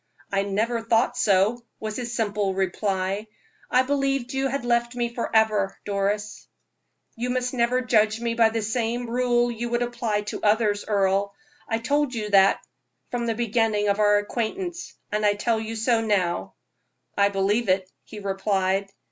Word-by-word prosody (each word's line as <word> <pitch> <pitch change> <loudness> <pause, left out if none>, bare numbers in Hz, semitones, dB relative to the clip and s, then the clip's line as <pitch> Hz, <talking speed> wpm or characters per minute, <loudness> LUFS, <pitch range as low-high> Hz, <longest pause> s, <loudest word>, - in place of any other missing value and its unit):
"I 195 0 +2
never 220 +4 -1
thought 230 +2 +2
so," 215 +1 +2 0.2
was 215 -1 -4
his 240 -1 -4
simply 205 -3 0
reply. 195 +1 -1 0.4
"I 255 +1 +4
believed 275 -2 -1
you 270 0 +1
had 270 -1 -3
left 240 0 +1
me 240 -1 -2
forever, 220 -4 +1
Doris." 205 +1 -2 0.7
"You 245 +2 -3
must 250 0 -1
never 250 +1 +2
judge 215 -3 +2
me 235 0 -1
by 230 -1 +4
the 225 0 -2
same 235 +2 -1
rule 240 0 +1
you 235 +1 -4
would 240 +1 +1
apply 235 -3 -1
to 210 - -6
others, 210 -1 +2
Earle. 200 -1 +1 0.3
I 225 - +1
told 275 +3 0
you 210 -2 -3
so 195 -1 +6 0.6
from 240 -1 -2
the 225 - 0
beginning 220 -2 +1
of 200 +1 +1
our 205 -1 +5
acquaintance, 335 - -3 0.2
I 210 -1 +2
tell 220 +2 0
you 225 +1 -5
so 225 +1 +2
now." 190 -5 0 0.6
"I 200 0 +4
believe 200 +3 0
it," 185 0 +2 0.2
he 215 - -11
replied. 195 0 0
220 Hz, 160 wpm, -25 LUFS, 205-240 Hz, 0.7 s, so